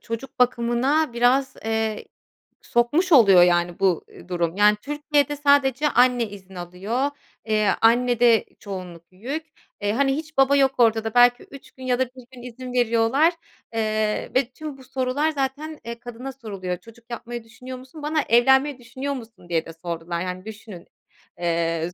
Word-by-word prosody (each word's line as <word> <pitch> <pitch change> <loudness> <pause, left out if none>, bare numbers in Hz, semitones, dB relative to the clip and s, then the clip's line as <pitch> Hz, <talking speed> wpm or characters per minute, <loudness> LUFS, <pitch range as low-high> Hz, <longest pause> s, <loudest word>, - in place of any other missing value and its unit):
çocuk 230 +4 -7
bakımına 250 +4 +2
biraz, 260 +3 +2
eee, 220 -1 -1 0.6
sokmuş 295 +10 +1
oluyor, 200 - +8
yani, 175 0 +1
bu, 185 -4 +2
eee, - - -15
durum. 170 -1 -1
Yani, 210 0 +5
Türkiye'de 290 0 0
sadece 285 0 +3
anne 245 -2 +4
izin 190 -2 -12
alıyor. 195 +10 -2 0.4
Eee, 215 -2 +2
annede 240 0 +4
çoğunluk 180 -4 -8
yük. 270 - -5 0.4
Eee, 205 - 0
hani, 270 +2 +2
hiç 315 0 -7
baba 270 +1 +5
yok 270 -1 +4
ortada 225 -2 +2
belki 245 0 +5
3 275 - -13
gün 260 - -13
ya 250 -1 0
da 260 - +3
1 255 0 -15
gün 250 - -12
izin 250 +1 -8
veriyorlar, 245 +7 +3 0.4
eee, 215 -1 -1
ve 255 -1 +2
tüm 300 +1 -8
bu 265 - -14
sorular 265 +4 -1
zaten, 290 +2 -3
eee, 235 0 -6
kadına 245 +3 -7
soruluyor. 195 -8 -5
"Çocuk 230 +5 -17
yapmayı 240 0 -6
düşünüyor 250 +3 -10
musun?" 265 +4 -12
Bana, 305 +1 +1
"Evlenmeyi 265 +4 +4
düşünüyor 260 +4 -5
musun?" 225 -8 -11
diye 165 -2 0
de 165 - -9
sordular, 170 0 -4
yani, 185 +1 -5
düşünün. 215 -5 -10 0.5
Eee, 165 -1 -1
s - - -25
240 Hz, 160 wpm, -23 LUFS, 210-270 Hz, 0.6 s, oluyor